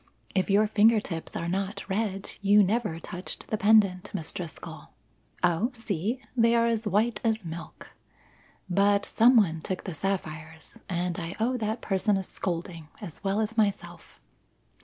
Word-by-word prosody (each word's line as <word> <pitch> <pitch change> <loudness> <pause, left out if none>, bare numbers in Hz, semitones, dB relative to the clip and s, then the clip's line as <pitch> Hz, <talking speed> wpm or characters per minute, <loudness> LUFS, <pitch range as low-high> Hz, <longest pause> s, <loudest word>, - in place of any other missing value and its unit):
If 190 0 +1
your 205 +2 +5
finger 220 +1 +4
tips 165 -5 -6
are 170 - -2
not 195 +3 -3
red, 195 -1 -2
you 205 +1 +6
never 205 -4 0
touched 180 +2 -6
the 215 - +1
pendant, 205 -2 +4
Miss 160 -4 -4
Driscoll. 170 -4 -8 0.5
Oh, 180 +7 +2
see! 225 +1 -2 0.2
They 230 -1 +4
are 230 0 +4
as 230 -1 0
white 210 +3 +1
as 220 -4 0
milk. 165 +1 -9 0.7
"But 200 +2 +3
some 240 +3 +5
one 165 -7 +3
took 185 +3 -4
the 185 - -5
sapphires, 160 -3 -4
and 175 -1 -1
I 170 +1 -5
owe 240 +4 +1
that 220 0 -2
person 195 +1 +1
a 190 - -2
scolding, 170 -3 -4
as 200 -3 -9
well 200 +2 +1
as 220 +1 -3
myself. 205 -2 -2
200 Hz, 160 wpm, -27 LUFS, 175-220 Hz, 0.7 s, you